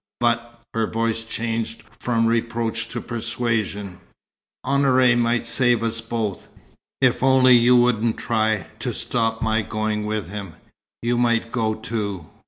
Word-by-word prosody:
But" 120 0 0
her 115 -1 0
voice 115 0 -1
changed 115 0 -3 0.2
from 115 -2 +1
reproach 115 0 -1
to 120 - -4
persuasion 115 -5 -3 0.7
"Honoré 130 -3 +4
might 120 0 +1
save 120 -1 +2
us 115 0 -1
both. 115 -4 -3 0.5
If 125 -2 +3
only 130 -1 +6
you 120 +1 +5
wouldn't 120 -2 +2
try 110 -5 0
to - - -3
stop 115 -1 -1
my 110 0 +2
going 105 0 -2
with 105 -4 -2
him, 100 -2 -7 0.5
you 120 +1 +1
might 115 -1 +1
go 110 -3 0
too. 105 -6 -4
115 Hz, 135 wpm, -22 LUFS, 110-120 Hz, 0.7 s, only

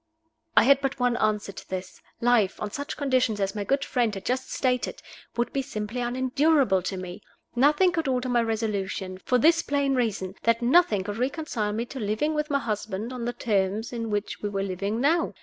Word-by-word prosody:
I - - +9
had 275 +3 +5
but 270 -1 -2
one 245 -1 +2
answer 210 -2 0
to - - -12
this. 185 0 -6 0.2
Life, 235 -5 +3
on 210 - -4
such 285 +6 -5
conditions 255 -6 +1
as 195 -1 0
my 205 - -3
good 275 +7 0
friend 240 -4 +1
had 195 - -7
just 260 +1 -1
stated, 250 -2 0 0.4
would 240 - 0
be 275 - +1
simply 220 0 -4
unendurable 260 - +2
to 190 +1 -3
me. 185 +2 -7 0.3
Nothing 300 +8 +4
could 325 -4 -1
alter 255 -1 0
my 245 -1 +2
resolution 205 -4 -2
for 250 - +1
this 330 +6 +5
plain 280 -3 0
reason, 210 -7 -1
that 230 +1 +2
nothing 240 - +4
could 205 +2 -5
reconcile 255 -5 -2
me 230 +3 -2
to 265 +2 -8
living 220 +8 0
with 300 0 -1
my 285 - +2
husband 215 -2 -3
on 245 -2 -4
the 240 - -2
terms 215 -1 -1
on 230 -1 -3
which 205 0 -3
we 205 - -2
were 195 -1 -2
living 200 +3 -2
now. 320 +6 +2
235 Hz, 200 wpm, -26 LUFS, 205-270 Hz, 0.4 s, I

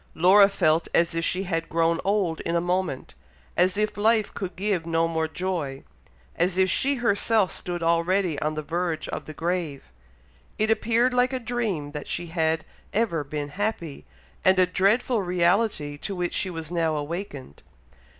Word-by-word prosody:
Laura 195 +4 +6
felt 165 -4 +2
as 170 0 +3
if 165 0 -1
she 185 +3 0
had 165 -3 -2
grown 165 +1 +2
old 195 -5 0
in 170 - -2
a - - +3
moment, 175 -5 -2 0.4
as 185 +2 +2
if 215 0 0
life 215 0 +2
could 185 -3 -5
give 195 -2 0
no 165 0 +1
more 160 -1 -1
joy 160 -5 -3 0.5
and 170 - +3
as 185 - -6
if 190 -1 +3
she 280 +7 +1
herself 220 -4 +2
stood 175 -1 -4
already 170 0 +1
on 155 0 -1
the 155 - -3
verge 165 0 -2
of - - -5
the 155 - -8
grave. 165 -4 -2 0.7
It 215 +1 +2
appeared 235 +3 +2
like 250 +1 +2
a 260 - -1
dream 225 -11 -2
that 150 -1 -6
she 175 - -3
had 160 -1 0 0.3
ever 195 -8 0
been 145 0 -4
happy, 180 -4 -4 0.4
and 190 0 +5
a 185 - +6
dreadful 205 +6 +2
reality 175 -4 +1
to 195 - -4
which 175 -1 -2
she 190 - -1
was 165 -2 -6
now 165 -2 +1
awakened. 145 - -6
175 Hz, 175 wpm, -25 LUFS, 160-200 Hz, 0.7 s, Laura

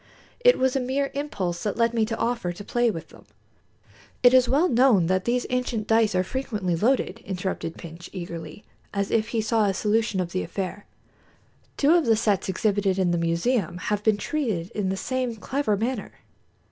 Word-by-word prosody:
It - - +5
was 260 0 +1
a - - +2
mere 270 +2 -1
impulse 195 -12 -3
that 210 - -2
led 230 0 +2
me 225 -2 +1
to 225 0 -3
offer 235 -7 -1
to 175 +4 -9
play 240 +3 +1
with 165 -7 -5
them." - - -17 1.0
"It 245 0 +7
is 255 -1 +5
well 295 +7 +3
known 240 - +4
that 185 +2 0
these 245 +1 0
ancient 250 -4 -1
dice 225 -3 +3
are 185 - +3
frequently 205 -5 -2
loaded," 240 +10 +1
interrupted 180 -3 -4
Pintsch, 170 0 -10
eagerly, 170 -1 -7 0.3
as 200 0 -1
if 220 -1 +2
he 230 -1 -1
saw 220 0 +2
a 195 -2 0
solution 215 0 +1
of 175 -2 -2
the 185 - -1
affair. 195 +1 -5 0.9
"Two 295 +3 +4
of 340 -6 +3
the 225 - +5
sets 205 -3 0
exhibited 195 0 +1
in 185 -2 +2
the 175 - +1
museum 170 +3 0
have 205 +3 -2
been 215 -1 +2
treated 210 - -2
in 200 -3 -2
the 190 - -2
same 255 +2 -2
clever 240 -1 -1
manner." 230 +1 -2
215 Hz, 190 wpm, -25 LUFS, 185-245 Hz, 1.0 s, It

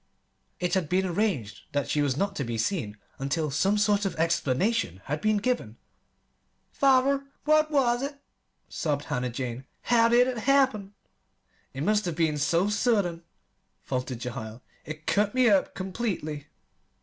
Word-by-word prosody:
It 180 0 -1
had 185 -6 0
been 190 +1 +2
arranged 175 - -1
that 145 0 0
she 150 - +1
was 140 -2 0
not 200 +3 -1
to 140 - -1
be 115 -2 -3
seen 110 - -2 0.2
until 140 +3 -1
some 190 +9 +2
sort 205 -1 +2
of 195 - -2
explanation 165 - 0
had 150 +2 -3
been 215 0 +2
given. 245 +4 -2 0.9
"Father, 275 0 +3 0.2
what 310 0 +4
was 250 -5 +2
it?" 280 +1 -4 0.5
sobbed 145 -2 -2
Hannah 125 0 -2
Jane. 125 0 -5 0.2
"How 230 -1 +4
did 245 +1 +5
it 250 -3 -2
happen?" 250 -7 +2 0.8
"It 135 - -5
must 210 +3 +2
have 175 -3 -2
been 155 -3 +1
so 170 +6 +2
sudden," 205 -5 +1 0.6
faltered 130 -1 -3
Jehiel. 115 -1 -7 0.2
"It 155 0 -8
cut 205 +2 +1
me 255 -1 +4
up 195 -2 +2
completely." 185 -7 -4
185 Hz, 150 wpm, -27 LUFS, 145-225 Hz, 0.9 s, did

